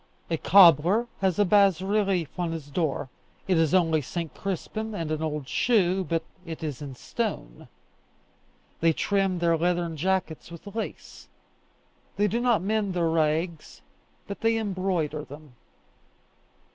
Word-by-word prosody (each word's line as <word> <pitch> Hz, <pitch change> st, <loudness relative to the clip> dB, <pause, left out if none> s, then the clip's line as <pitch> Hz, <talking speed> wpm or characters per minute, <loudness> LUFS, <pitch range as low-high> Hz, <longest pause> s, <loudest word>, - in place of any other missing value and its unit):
A 165 Hz, -, +1 dB
cobbler 180 Hz, -, +6 dB
has 190 Hz, -3 st, +1 dB
a 205 Hz, -, +4 dB
bas 195 Hz, -3 st, +4 dB
relief 195 Hz, -4 st, -1 dB
on 175 Hz, -2 st, -1 dB
his 150 Hz, -3 st, -7 dB
door: 145 Hz, -4 st, -1 dB, 0.4 s
it 185 Hz, -, +3 dB
is 160 Hz, -2 st, +2 dB
only 165 Hz, -4 st, +3 dB
St. 170 Hz, +2 st, -5 dB
Crispin 215 Hz, +3 st, -4 dB
and 165 Hz, -4 st, -3 dB
an 155 Hz, 0 st, -2 dB
old 150 Hz, -3 st, -3 dB
shoe, 190 Hz, -, +2 dB
but 165 Hz, -2 st, -1 dB, 0.2 s
it 165 Hz, -2 st, -7 dB
is 150 Hz, -3 st, -4 dB
in 140 Hz, -3 st, -7 dB
stone. 160 Hz, -, -5 dB, 1.1 s
They 165 Hz, 0 st, +3 dB
trim 195 Hz, +1 st, 0 dB
their 170 Hz, -1 st, +2 dB
leathern 170 Hz, 0 st, 0 dB
jackets 185 Hz, -1 st, -1 dB
with 170 Hz, +2 st, -11 dB
lace. 215 Hz, +2 st, -7 dB, 0.9 s
They 205 Hz, -, +2 dB
do 230 Hz, +4 st, -1 dB
not 235 Hz, -7 st, +2 dB
mend 205 Hz, -2 st, -1 dB
their 170 Hz, -2 st, +1 dB
rags, 160 Hz, +1 st, -1 dB, 0.4 s
but 200 Hz, -, -7 dB
they 225 Hz, 0 st, +2 dB
embroider 185 Hz, -7 st, -2 dB
them. 145 Hz, -1 st, -12 dB
175 Hz, 145 wpm, -26 LUFS, 160-195 Hz, 1.1 s, cobbler